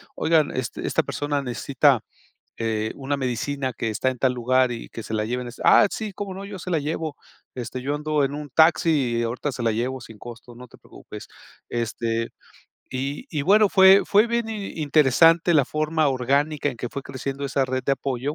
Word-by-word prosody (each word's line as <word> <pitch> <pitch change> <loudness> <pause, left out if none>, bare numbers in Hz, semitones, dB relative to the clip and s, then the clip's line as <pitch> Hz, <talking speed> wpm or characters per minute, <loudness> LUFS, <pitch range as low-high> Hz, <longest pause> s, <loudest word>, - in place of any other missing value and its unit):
"Oigan, 160 -2 +2
este 130 -3 -4
esta - - +1
persona 145 -1 -2
necesita 135 +1 +2 0.6
eh, 110 -1 -1
una 140 +1 -3
medicina 130 +1 -2
que 115 - -3
está 110 +5 0
en 125 - -10
tal 130 0 +3
lugar 125 +1 +2
y 115 - -6
que 115 - -8
se - - -7
la 105 - -1
lleven". 125 +2 -3
Ah, - - +6
sí, 215 -1 -5
cómo 195 0 -6
no, 195 +1 -7
yo 200 -2 -8
se 185 - -7
la 165 - +2
llevo. 155 +1 -3 0.4
Este, 125 +1 -5
yo 145 +3 -2
ando 150 0 0
en 140 +1 -1
un 150 -1 -7
taxi 165 +3 +4 0.3
y - - 0
ahorita 120 +5 -3
se 125 -2 -5
la 115 - +2
llevo 125 +4 -2
sin 110 -2 -13
costo, 120 0 -11
no 125 +1 -11
te - - -18
preocupes. - - -12 0.4
Este, 115 -1 -2 0.6
y 140 - -4
y 150 -4 -2
bueno 205 +5 +5
fue 190 0 +7
fue 210 +3 +4
bien 235 -1 -1
interesante 165 - +3
la 145 -3 +5
forma 155 +2 0
orgánica 140 +3 0
en 125 - -5
que 120 - -5
fue 140 +3 -6
creciendo 135 +1 -5
esa 135 0 0
red 130 0 -2
de 140 - +2
apoyo, 135 +1 -3
140 Hz, 200 wpm, -23 LUFS, 125-155 Hz, 0.6 s, fue